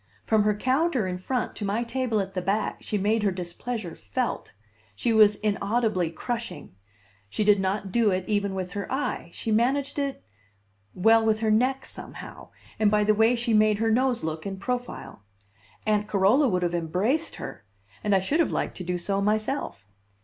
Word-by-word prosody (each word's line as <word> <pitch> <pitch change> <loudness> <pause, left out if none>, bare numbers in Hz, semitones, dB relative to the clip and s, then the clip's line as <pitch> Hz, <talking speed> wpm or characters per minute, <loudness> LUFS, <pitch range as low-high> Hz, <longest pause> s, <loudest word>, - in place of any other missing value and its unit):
From 220 -1 +3
her 210 0 +2
counter 260 - +1
in 180 -1 -3
front 250 +6 -2
to - - -5
my 205 +4 0
table 240 -2 -1
at 195 0 -6
the 185 - -2
back 200 +4 -1
she 210 - -2
made 210 +3 +1
her 205 - +2
displeasure 180 +2 -5
felt; 100 -2 -3 0.4
she 230 - 0
was 210 -1 +6
inaudibly 210 -3 0
crushing; 230 - -5 0.6
she 160 - -1
did 205 -1 +5
not 195 +1 -1
do 230 -1 +3
it 185 -1 -1
even 200 -2 0
with 185 -1 -4
her 200 +1 -5
eye, 265 - -2
she 220 - -4
managed 270 +6 +1
it 280 -1 -3 0.7
well, 225 +4 +5
with 220 0 +1
her 220 -1 +2
neck, 255 +5 +2
somehow, - - -10 0.3
and 215 -1 +4
by 210 0 +3
the 215 +1 +4
way 225 +3 +4
she 235 -1 -1
made 215 -1 +4
her 225 +1 +1
nose 250 +1 +1
look 160 0 -3
in 195 -1 -5
profile. 245 - -5 0.6
Aunt 210 -1 +1
Carola 210 +9 +4
would 180 -5 0
have 175 0 0
embraced 190 - 0
her - - -8 0.4
and 205 -1 +3
I 190 - +3
should 280 - 0
have 335 - +3
liked - - -2
to 185 - -5
do 180 0 -2
so 195 +3 -1
myself. 215 - -1
210 Hz, 185 wpm, -26 LUFS, 190-235 Hz, 0.7 s, was